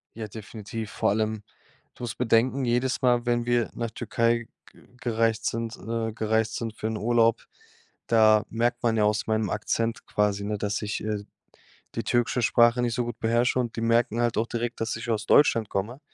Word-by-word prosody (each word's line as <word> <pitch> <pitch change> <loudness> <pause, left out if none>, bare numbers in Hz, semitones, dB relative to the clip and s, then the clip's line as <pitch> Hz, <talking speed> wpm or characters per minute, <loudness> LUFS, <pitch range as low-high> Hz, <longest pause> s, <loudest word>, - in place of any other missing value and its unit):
Ja, 110 -1 -5
definitiv. 110 +1 -7
Vor - - 0
allem, 110 0 -1 0.5
du - - -10
musst 120 -2 -4
bedenken, 125 +3 +2
jedes 125 +2 0
Mal, 120 -1 +3
wenn 120 -1 +1
wir 120 -1 +1
nach 115 -1 -4
Türkei 115 0 0 0.3
ge - - -19 0.2
gereist 115 -2 0
sind 115 0 -3
äh, 115 +2 -3
gereist 110 0 0
sind 115 -2 -4
für 110 - -4
'n 110 - -2
Urlaub, 115 0 +2 0.6
da 110 -2 +5
merkt 120 +1 -1
man 115 -1 +2
ja 105 - +3
aus 105 0 +1
meinem 110 -2 0
Akzent 115 +2 -2
quasi, 105 -1 0
ne, 105 +1 -2
dass 105 +2 -2
ich, 105 0 -3
äh, 105 -1 -2
d 100 - -10 0.7
die - - -2
türkische 120 +1 +1
Sprache 120 +1 +4
nicht 120 -1 0
so 125 - 0
gut 120 -1 -6
beherrsche 120 +3 +2
und 120 -2 -2
die 115 - -3
merken 115 0 +2
halt 120 -1 0
auch 115 - +1
direkt, 120 0 -3
dass 115 - -1
ich 115 +1 -6
aus 110 -2 -1
Deutschland 115 -7 +4
komme. 110 +8 -3
115 Hz, 195 wpm, -26 LUFS, 110-120 Hz, 0.7 s, da